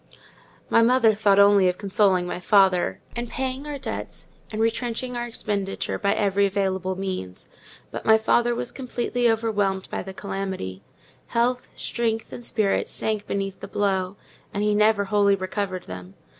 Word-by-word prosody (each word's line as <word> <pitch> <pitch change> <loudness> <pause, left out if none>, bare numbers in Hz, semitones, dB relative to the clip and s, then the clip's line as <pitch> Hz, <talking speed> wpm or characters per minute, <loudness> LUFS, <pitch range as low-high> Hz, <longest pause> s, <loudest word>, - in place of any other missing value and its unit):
My 230 - +4
mother 230 -1 +5
thought 205 -1 +3
only 200 -2 +6
of 180 - -2
consoling 195 -2 +2
my 180 - -4
father, 190 -2 +3 0.2
and 240 0 -4
paying 265 +2 -3
our 295 -1 -4
debts 265 - -6 0.2
and 215 - -4
retrenching 240 +2 -1
our 240 0 -2
expenditure 200 -4 -3
by 200 -2 +1
every 200 -1 +2
available 190 -1 -1
means; 185 - -5 0.4
but - - -5
my 220 0 +6
father 235 +2 +2
was 240 - -3
completely 245 -2 -1
overwhelmed 205 -4 0
by - - -2
the 190 - -7
calamity: 190 - -4 0.5
health, 245 +1 0
strength, 225 -1 -2
and 240 - -7
spirits 215 -4 0
sank 215 -2 -2
beneath 195 -1 -3
the - - -7
blow, 195 -1 -1 0.3
and 205 - -2
he 210 0 +2
never 210 0 +4
wholly 200 0 +3
recovered 185 -1 -3
them. 90 +1 -9
205 Hz, 155 wpm, -24 LUFS, 190-230 Hz, 0.5 s, only